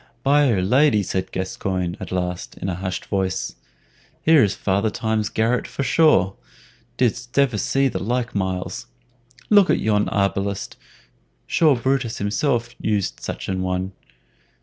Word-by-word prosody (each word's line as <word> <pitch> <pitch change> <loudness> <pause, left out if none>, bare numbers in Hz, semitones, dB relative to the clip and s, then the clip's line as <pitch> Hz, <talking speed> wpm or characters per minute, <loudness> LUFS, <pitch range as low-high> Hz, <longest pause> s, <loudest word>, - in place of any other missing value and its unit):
"By 140 -1 +4
'r 95 -4 +1
Lady!" 120 0 +4
said 95 0 -3
Gascoyne 95 -1 -2
at - - -7
last, 90 -1 -3
in 95 - -3
a - - -1
hushed 95 0 -4
voice, 95 -2 -2 0.7
"here 160 -2 +6
is 100 -2 +2
Father 100 +3 0
Time's 110 0 -1
garret 115 +3 0
for 140 - -4
sure. 130 - +3 0.6
Didst 120 0 -1
ever 130 -7 +3
see 135 +5 +2
the - - -3
like, 120 +3 -1
Myles? 95 -2 -3 0.6
Look 205 -3 +6
at - - +4
yon 105 -1 +1
arbalist; 100 0 -1 0.7
sure 155 -4 +3
Brutus 125 -1 -1
himself 120 +3 0
used 105 -3 -1
such - - -6
an 95 -1 -2
one!" 95 +1 -2
105 Hz, 145 wpm, -22 LUFS, 95-125 Hz, 0.7 s, here